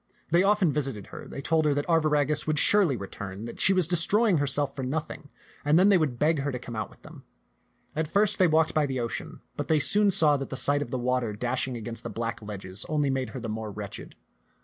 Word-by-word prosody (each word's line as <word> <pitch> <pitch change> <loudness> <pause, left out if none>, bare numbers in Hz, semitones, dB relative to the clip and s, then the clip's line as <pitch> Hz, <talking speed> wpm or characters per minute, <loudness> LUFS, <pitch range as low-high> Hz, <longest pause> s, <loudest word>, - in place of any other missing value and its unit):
They 170 +2 +5
often 195 -5 +3
visited 135 -9 -2
her, - - -8
they 140 - -8
told 160 +1 +2
her 145 -2 +2
that 145 - -1
Arviragus 150 -3 +1
would 155 -1 0
surely 175 -5 +4
return, 100 +1 -7
that 120 - -9
she - - +5
was 185 -3 +3
destroying 180 +3 +2
herself 140 0 +1
for 135 - -5
nothing; 150 +2 -4 0.3
and 150 +2 +3
then 190 +3 +5
they 195 - +6
would 140 -7 -1
beg 155 +3 +2
her 140 +1 -2
to 125 - -4
come 120 -1 -8
out 110 -2 -3
with - - -21
them. - - -13 0.7
At 155 0 -1
first 205 +5 +2
they 185 - +5
walked 160 0 +2
by 150 -2 +2
the 130 -1 -3
ocean, 115 -1 -5
but - - -4
they 160 - +3
soon 205 +7 +3
saw 155 -7 +3
that 135 - -6
the 130 - -5
sight 145 +2 +2
of 145 - -4
the 130 - -2
water 125 -3 -1
dash 125 +5 -2
ing 125 -2 -5
against 115 +1 -6
the - - -6
black 115 0 -4
ledges 100 -2 -5
only 145 -3 +1
made 130 -3 -2
her 130 - -7
the 115 - -6
more 110 0 -4
wretched. 100 -1 -8
145 Hz, 240 wpm, -27 LUFS, 120-160 Hz, 0.7 s, they